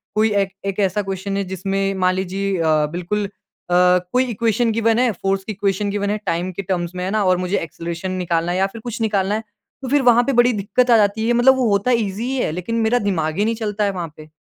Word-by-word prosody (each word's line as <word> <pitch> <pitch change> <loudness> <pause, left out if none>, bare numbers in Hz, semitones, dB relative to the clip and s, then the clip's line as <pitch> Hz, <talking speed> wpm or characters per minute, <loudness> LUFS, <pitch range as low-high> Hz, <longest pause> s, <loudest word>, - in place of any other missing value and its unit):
कोई 215 0 +3
एक, 200 -1 +1 0.2
एक 195 0 -3
ऐसा 195 0 +1
क्वेस्चन 195 0 -4
है 200 - 0
जिसमें 195 +1 -1
मान 185 -1 +2
लीजिए 190 +1 -2
अ, 155 -2 +3
बिल्कुल 180 +5 -2
अ, 195 -2 -7 0.4
कोई 255 +1 +3
इक्वेशन 230 +1 +1
गिवेन 230 +1 +2
है, 250 -2 +3
फ़ोर्स 195 0 -2
की 220 - -5
इक्वेशन 200 0 -1
गिवेन 200 0 -1
है, 210 - 0
टाइम 175 +2 -1
के 185 - -5
टर्म्स 180 -2 -3
में 180 - -3
है - - -2
ना, 215 0 +1
और 185 -1 +3
मुझे 185 +2 -1
ऐक्सेलरेशन 170 +3 -5
निकालना 175 -2 -1
है 180 - -1
या 190 +1 +2
फिर 220 +3 -11
कुछ 240 0 -6
निकालना 205 -2 +1
है, 220 - -3 0.4
तो 260 - -5
फिर 285 +1 +3
वहाँ 240 -1 +5
पे 275 - +1
बड़ी 240 0 +4
दिक्कत 210 +5 0
आ - - +7
जाती 215 +1 +1
है। 240 - +3
मतलब 250 +3 +5
वो 250 -3 +1
होता 200 +4 +2
ईजी 215 -3 0
ही 260 +2 -2
है, 245 - 0
लेकिन 180 +8 -4
मेरा 235 +2 +2
दिमाग 160 -6 -1
ही 205 - +2
नहीं 230 +1 0
चलता 210 -2 -2
है 200 - +1
वहाँ 175 -5 -6
पे। 155 0 -12
200 Hz, 255 wpm, -20 LUFS, 185-220 Hz, 0.4 s, आ